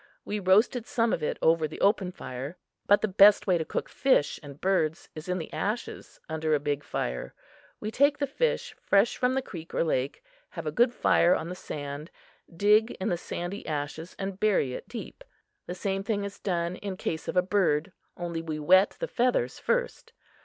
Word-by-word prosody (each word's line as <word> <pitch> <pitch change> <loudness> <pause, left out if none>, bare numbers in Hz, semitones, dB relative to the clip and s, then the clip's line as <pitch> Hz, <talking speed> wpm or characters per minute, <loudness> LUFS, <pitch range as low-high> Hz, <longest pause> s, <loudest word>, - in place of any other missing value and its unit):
We 210 - -2
roasted 210 +5 +3
some 230 -1 +1
of - - -1
it 150 - -1
over 160 -1 +4
the 155 - -9
open 200 -2 +2
fire. 135 +1 -7 0.3
But 205 - +5
the 215 - +1
best 200 +1 +6
way 180 -3 +2
to - - 0
cook - - -3
fish 260 - +2
and 145 -1 -11
birds 170 -4 0
is 155 +3 -8
in 180 - 0
the 160 - -7
ashes, 215 +4 -4
under 160 -1 0
a - - +1
big 145 0 -2
fire. 60 0 -4 0.4
We 215 - -4
take 285 +5 +3
the 285 - 0
fish 480 - -1
fresh 200 +3 +3
from 250 +1 +1
the 265 - 0
creek 165 -6 -9
or - - +2
lake, 140 -4 -1 0.3
have - - -7
a - - -1
good 240 0 +3
fire 180 -7 +4
on 165 - -4
the 180 - -5
sand, 145 -1 -6 0.4
dig 210 +6 +4
in 190 - -1
the 175 - +1
sandy 175 +3 -5
ashes 150 +3 -4
and 195 -1 -4
bury 200 -12 +2
it - - -8
deep. 235 - -8 0.4
The 180 - -4
same 195 +1 -2
thing 205 0 -1
is 200 0 -6
done 175 -1 -1
in 195 -2 -5
case 160 -3 -3
of - - -2
a 180 - +5
bird, 185 -4 +1 0.3
only 170 -1 -3
we 160 -2 -4
wet 185 +6 +4
the - - -2
feathers 240 - 0
first. - - -2
185 Hz, 200 wpm, -28 LUFS, 160-210 Hz, 0.4 s, best